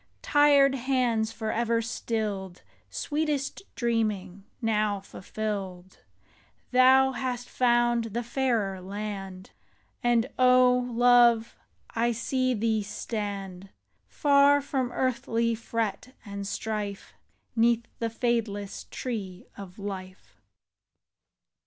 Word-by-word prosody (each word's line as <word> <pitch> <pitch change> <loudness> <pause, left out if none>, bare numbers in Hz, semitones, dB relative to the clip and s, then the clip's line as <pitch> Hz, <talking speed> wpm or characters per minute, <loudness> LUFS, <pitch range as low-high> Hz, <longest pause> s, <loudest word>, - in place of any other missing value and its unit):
Tired 285 -2 +5
hands 245 -4 0
forever 230 +1 -1
stilled. 215 -5 -3 0.3
Sweetest 295 -2 -2
dreaming 210 -5 -1
now 215 -3 0
fulfilled! 190 -2 -6 0.7
Thou 260 +1 +6
hast 250 -2 -4
found 240 -1 +2
the 230 +2 -3
fairer 230 -7 -1
land, 195 -1 -6 0.5
And, 240 -1 +3
O 250 0 +6 0.2
love, 240 -1 +4 0.4
I 235 +1 +1
see 255 +2 0
thee 220 0 +1
stand. 200 -3 -5 0.4
Far 285 -1 +4
from 265 -3 -2
earthly 235 -2 0
fret 230 +1 -3
and 200 -1 -6
strife, 210 -2 -4 0.4
'Neath 235 0 +3
the 230 - -1
fadeless 225 -4 -2
Tree 200 -7 -5
of 190 -3 -10
Life. 190 -2 -8
230 Hz, 90 wpm, -27 LUFS, 200-250 Hz, 0.7 s, Thou